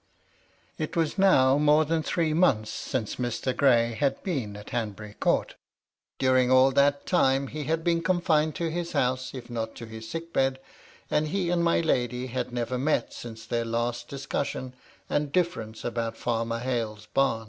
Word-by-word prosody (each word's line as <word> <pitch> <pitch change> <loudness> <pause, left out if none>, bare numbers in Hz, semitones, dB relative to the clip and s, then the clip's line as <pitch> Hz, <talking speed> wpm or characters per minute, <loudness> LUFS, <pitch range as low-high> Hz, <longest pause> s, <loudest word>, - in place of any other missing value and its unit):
It 155 +2 -3
was 165 +3 0
now 140 -8 +5
more 150 +1 +4
than 160 +1 0
three 160 0 0
months 135 -11 +2
since 115 -5 -3
Mr. 125 +1 -2
Gray 120 -4 +3
bad 140 -2 +1
been 125 - -3
at 105 - -11
Hanbury 105 -3 -4
Court - - 0 0.6
During 130 -1 +3
all 130 +1 +6
that 140 +1 +3
time, 135 -6 +3
he 150 -1 -5
had 160 +2 0
been 170 -1 +2
confined 165 -3 +2
to 170 -3 -2
his 170 +1 -3
house, 130 +1 0
if 125 -2 -8
not 115 -2 -4
to 115 - -8
his 110 0 -9
sick 165 0 -6
bed, 135 0 +1 0.5
and 150 +1 +2
he 175 +1 -1
and 175 -1 +2
my 170 0 +3
lady 125 -5 0
had 125 0 -3
never 120 +1 -2
met 150 +4 0
since 115 -2 -9
their 115 +1 -1
last 120 +1 -2
dis 135 -1 -7
cussion 130 -2 -3 0.3
and 145 -1 -1
difference 140 -12 -1
about 115 -1 -2
Farmer 115 -1 -1
Hale's 115 -4 -3
bam. 135 -4 +2
130 Hz, 175 wpm, -27 LUFS, 115-155 Hz, 0.6 s, all